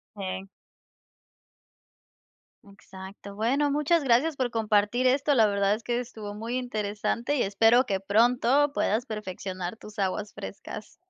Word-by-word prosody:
Sí. 190 -1 -5 2.2
Exacto. 200 0 -12
Bueno, 270 +7 +1
muchas 300 +3 +2
gracias 270 +5 +3
por 255 -2 -1
compartir 220 +2 +2
esto. 280 +3 +2
La 225 -3 +6
verdad 200 0 +2
es 225 - -10
que 240 +1 -1
estuvo 220 -4 -7
muy 225 +4 -4
interesante 230 +2 -2
y - - +2
espero 225 +6 +4
que 195 -1 -1
pronto 245 +8 +3
puedas 225 -3 0
perfeccionar 190 -3 -5
tus 210 -1 -12
aguas 200 +2 -2
frescas. 210 +1 -8
220 Hz, 130 wpm, -27 LUFS, 200-250 Hz, 2.2 s, La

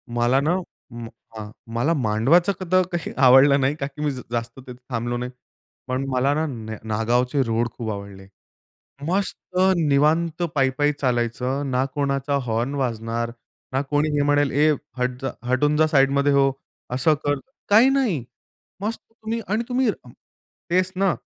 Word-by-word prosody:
मला 120 +3 +3
ना 155 +5 +1 0.4
अं, 115 -1 -7 0.3
हां, 105 0 -7 0.2
मला 140 +8 +1
मांडवाचं 140 - +3 0.2
तर 185 0 +5
काही 175 -3 -3
आवडलं 135 +2 +7
नाही 135 +3 +1
का 140 -3 -3
की 150 +1 -10
मी 145 - +1
जास्त 120 -1 -5
तिथे 125 -1 -10 0.2
थांबलो 120 0 -2
नाही. 125 +1 -4 0.6
पण 130 +1 -2
मला 130 +2 +1
ना 155 +2 0 0.4
नागावचे 120 +5 +1
रोड 115 0 0
खूप 115 -3 -4
आवडले. 100 -1 -8 0.8
मस्त 185 0 -2 0.2
निवांत 160 +2 +2
पायी-पायी 140 +2 +2
चालायचं. 125 +2 0
ना 125 +1 +2
कोणाचा 140 0 0
हॉर्न 120 +5 -1
वाजणार, 115 -2 -2 0.4
ना 135 - +1
कोणी 150 +1 +1
हे - - +2
म्हणेल, 145 -1 +2
"ए 150 +3 +4 0.3
हट 125 0 -2
जा 135 - -2 0.2
हटून 150 +4 +2
जा 155 0 +4
साइडमध्ये 140 -1 +3
हो." 135 -1 +4 0.4
असं 145 +5 +3
कर 145 -1 +1 0.3
काही 225 +6 +6
नाही. 245 - +1 0.6
मस्त, 220 +2 -2
तुम्ही 225 0 -4
आणि 215 +4 0
तुम्ही 250 -1 +2 0.8
तेच 185 +1 +2
ना 195 -2 +2
140 Hz, 150 wpm, -23 LUFS, 120-155 Hz, 0.8 s, आवडलं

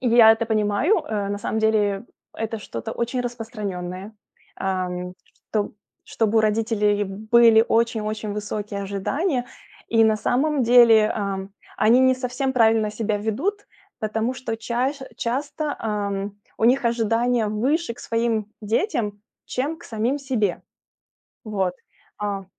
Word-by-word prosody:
И 255 - +1
я 230 -1 +8
это 225 +1 -1
понимаю, 220 - +2
э, 210 -8 -2
на 205 0 -2
самом 220 - -2
деле 210 -2 +1 0.3
это 225 0 -3
что-то 115 - -6
очень 240 +2 -2
распространенное, 210 -5 -5 0.4
ам, 180 -1 -2 0.4
чтоб 210 -2 -1 0.3
чтобы 225 0 +1
у - - +6
родителей 210 -1 +1
были 220 +3 +5
очень 230 0 +2
очень 215 0 -3
высокие 210 -1 -4
ожидания. 245 - -1 0.4
И 225 -1 +4
на 220 -1 +3
самом 270 +6 +1
деле, 230 -2 +7
а, 195 -2 -3 0.3
они 230 +4 +5
не 260 0 +5
совсем 255 +1 -2
правильно 225 -3 +3
себя 215 0 -1
ведут, 290 - -2 0.3
потому 220 +3 -1
что 245 -3 -4
час 250 +5 -2 0.2
часто, 285 +5 -2
эм, 205 -2 -2 0.2
у - - +1
них 255 +3 +4
ожидания 235 0 +1
выше 235 +7 0
к - - -14
своим 230 -2 0
детям, 220 - -1 0.2
чем 285 +6 -2
к 345 - -16
самим 230 +5 -1
себе. 245 -9 -1 0.8
Вот, 195 -4 -1 0.5
а, 200 -2 -3
220 Hz, 135 wpm, -23 LUFS, 210-245 Hz, 0.8 s, я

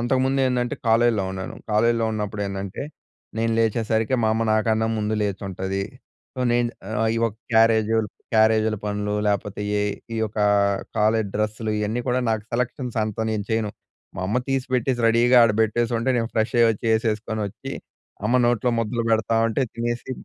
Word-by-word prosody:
అంతకుముందు 130 +2 +1
ఏందంటే, 125 -1 0
కాలేజీలో 115 -2 +3
ఉన్నాను. 95 -1 -6 0.2
కాలేజీలో 115 +2 +2
ఉన్నప్పుడు 105 -1 -3
ఏందంటే, 100 -1 -5 0.6
నేను 115 0 +1
లేచేసరికి 110 +1 +1
మా 110 - +3
అమ్మ 115 - 0
నాకన్నా 110 +1 +2
ముందు 105 0 -1
లేచుంటది. 95 -1 -3 0.5
సో, 130 - -5
నేను 120 0 +1 0.2
ఆహ్, 110 +1 0
ఈ - - +1
యొక్క 110 -2 -2 0.2
క్యారేజుల్ 110 -1 +4 0.3
క్యారేజీల 110 0 +3
పనులు 105 0 -2
లేకపోతే 105 0 -1 0.2
ఏ - - +1 0.3
ఈ - - -2
యొక్కా 105 -1 -1 0.5
కాలేజ్ 110 0 +2
డ్రెస్సులు 110 +1 -2
ఇయన్నీ 105 +3 -1
కూడా, 125 +1 +2
నాకు 110 -1 -1
సెలెక్షన్స్ 125 0 -2
అంతా 110 +1 -3
నేను 105 -2 -2
చేయను. 110 -2 0 0.5
మా - - -4
అమ్మ 105 +5 0
తీసిపెట్టేసి 130 -1 0
రెడీగా 120 +2 +4
ఆడ 115 - +4
పెట్టేసుంటే, 115 +2 0
నేను 115 -1 -1
ఫ్రెష్ 110 +2 0
అయ్యి 115 -1 +6
వచ్చి. 110 +1 -4
ఏసేసుకొనొచ్చి 110 -2 -2 0.5
అమ్మ 120 +4 +3
నోట్లో 120 0 +2
ముద్దలు 115 +1 -1
పెడతా 110 0 +1
ఉంటే 115 +4 0
తినేసి 120 +2 -3
110 Hz, 155 wpm, -23 LUFS, 105-120 Hz, 0.6 s, అయ్యి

